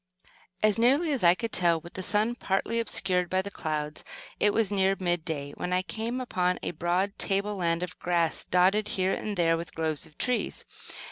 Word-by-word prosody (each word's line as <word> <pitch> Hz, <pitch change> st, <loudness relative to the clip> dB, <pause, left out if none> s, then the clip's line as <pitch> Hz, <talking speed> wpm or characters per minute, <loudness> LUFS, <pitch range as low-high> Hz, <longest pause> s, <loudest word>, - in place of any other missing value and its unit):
As 215 Hz, +1 st, +3 dB
nearly 280 Hz, +8 st, +3 dB
as 270 Hz, -7 st, -1 dB
I 170 Hz, 0 st, +6 dB
could 230 Hz, +3 st, -4 dB
tell, 170 Hz, -2 st, +4 dB
with 170 Hz, +2 st, -13 dB
the 190 Hz, -, -4 dB
sun 210 Hz, +5 st, +1 dB
partly 230 Hz, 0 st, -1 dB
obscured 185 Hz, -5 st, +1 dB
by 185 Hz, 0 st, +1 dB
clouds, 155 Hz, -6 st, -4 dB, 0.4 s
it 205 Hz, -, +4 dB
was 220 Hz, -1 st, +1 dB
near 195 Hz, -1 st, +2 dB
mid 175 Hz, -3 st, 0 dB
day 145 Hz, -3 st, -4 dB
when 180 Hz, -, -3 dB
I 180 Hz, +1 st, +1 dB
came 225 Hz, +6 st, -4 dB
upon 180 Hz, -7 st, 0 dB
a -, -, -2 dB
broad 175 Hz, +4 st, -1 dB
table 200 Hz, +1 st, 0 dB
land 170 Hz, -1 st, 0 dB
of 180 Hz, -, -7 dB
grass, 170 Hz, -2 st, 0 dB
dotted 190 Hz, +4 st, +2 dB
here 190 Hz, +1 st, +1 dB
and 210 Hz, -2 st, -4 dB
there 165 Hz, -1 st, +3 dB
with 170 Hz, +1 st, -7 dB
groves 160 Hz, -1 st, -2 dB
of 155 Hz, -, -23 dB
trees. 250 Hz, -1 st, -1 dB
185 Hz, 195 wpm, -28 LUFS, 170-210 Hz, 0.4 s, I